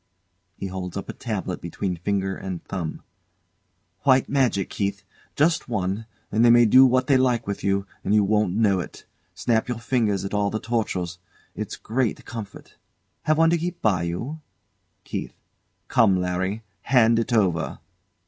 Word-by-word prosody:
[He - - -5
holds 90 -2 -5
up - - -6
a - - -3
tabloid - - -4
between 90 +2 -3
finger 95 +2 -1
and 95 -3 -6
thumb] 85 -5 -5 1.0
White 130 -2 +4
magic, 125 -9 +1
Keith! 100 0 -2 0.3
Just 155 -2 +2
one 105 0 -2 0.2
and 110 +2 +3
they 120 - +7
may 120 0 +7
do 130 +4 +7
what 130 0 +2
they 140 -1 +4
like 125 -3 +2
to 100 0 -3
you, 100 0 +1 0.2
and - - -1
you 105 - +5
won't 105 -2 +1
know 105 -4 +3
it. - - -8 0.3
Snap 115 -1 +1
your 125 -2 -2
fingers 115 -5 0
at 100 - -5
all 105 -1 +1
the 110 - -2
tortures. 95 -7 -2 0.3
It's - - -5
a - - -18
great 120 0 -1
comfort! 110 -3 -9 0.5
Have 155 0 +3
one 165 0 +5
to 170 - +2
keep 175 +1 -4
by 100 -6 +3
you? 115 - -4 0.6
KEITH. - - -5 0.5
Come, 100 -5 +4
Larry! 95 +4 -2 0.2
Hand 115 -3 +4
it 115 +2 -2
over. 95 -8 +1
110 Hz, 165 wpm, -24 LUFS, 95-125 Hz, 1.0 s, they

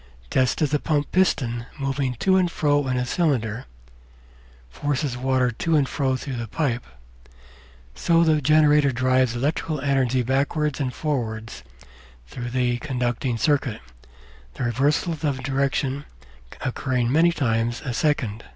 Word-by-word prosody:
Just 130 +4 +2
as 150 -1 0
a 150 - +3
pump 145 -1 -1
piston, 125 -10 +1
moving 135 -2 -1
to 190 - +2
and 185 -2 +3
fro 145 -3 +1
in 125 -1 0
a 125 - 0
cylinder, 125 - 0 1.0
forces 140 - -2
water 130 0 +1
to 160 +8 0
and 145 -3 +3
fro 135 -2 0
through 130 -1 -5
the 120 -1 -4
pipe, 125 -2 -1 1.1
so 165 - +3
the 155 -2 +3
generator 150 -1 +4
drives 130 -1 +2
electrical 150 +4 -1
energy 130 -2 +1
backwards 140 +3 0
and 130 -3 -1
forwards 115 -7 -3 0.6
through 120 - -6
the 120 -1 0
conducting 125 -3 -2
circuit, 135 -3 +1 0.8
the - - -4
reversals 145 - 0
of 135 -3 -1
direction 140 +1 -1 0.6
occurring 125 -2 -1
many 165 +4 +4
times 120 -5 -1
a 125 - -2
second. 120 -5 0
135 Hz, 135 wpm, -23 LUFS, 125-150 Hz, 1.1 s, generator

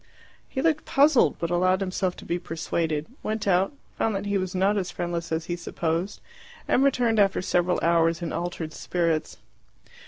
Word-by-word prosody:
He 265 - -3
looked 315 -2 +1
puzzled, 280 -1 +4
but 170 0 -3
allowed 185 +2 +3
himself 185 -1 -1
to - - -12
be 175 - -1
persuaded, 160 -2 -2 0.2
went 215 -1 -3
out, 190 0 +3 0.3
found 220 -2 +1
that 195 +1 -3
he 205 0 -1
was 185 0 -4
not 195 +3 +2
as 190 -3 -1
friendless 170 -1 -4
as 160 0 -1
he 175 - -2
supposed, 170 +2 -3 0.5
and 260 - +3
returned 240 -5 +2
after 195 -1 +3
several 180 0 +1
hours 165 0 +3
in 170 -2 -4
altered 170 -2 -4
spirits. 165 -3 -1
180 Hz, 175 wpm, -26 LUFS, 170-205 Hz, 0.5 s, puzzled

